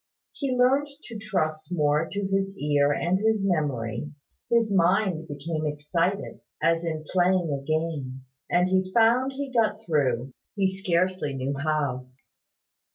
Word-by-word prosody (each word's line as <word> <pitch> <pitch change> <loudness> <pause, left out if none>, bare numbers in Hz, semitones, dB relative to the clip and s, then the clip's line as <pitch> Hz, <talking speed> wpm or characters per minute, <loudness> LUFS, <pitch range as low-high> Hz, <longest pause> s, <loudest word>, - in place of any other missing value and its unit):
He 275 -3 -3
learned 265 +4 +3 0.2
to 230 -3 -8
trust 160 -7 -2
more 150 -1 +2
to 200 - -2
his 195 0 -1
ear 145 -3 +2
and 175 +5 +1
his 220 -1 +1
memory: 145 - -1 0.4
his 230 -3 +2
mind 180 -2 +2
became 155 +1 -3
excited, 165 +6 -2 0.2
as 165 0 +2
in 155 -2 -3
playing 180 -2 +2
a 140 - -3
game: 145 -4 -3 0.2
and 180 +1 +3
he 185 0 +1
found 240 +4 +4
he 275 0 -5
got 220 -2 +1
through, 130 -5 0 0.2
he 195 -2 +2
scarcely 185 -5 0
knew 135 +1 -2
how. 140 -3 -1
170 Hz, 140 wpm, -26 LUFS, 150-195 Hz, 0.4 s, found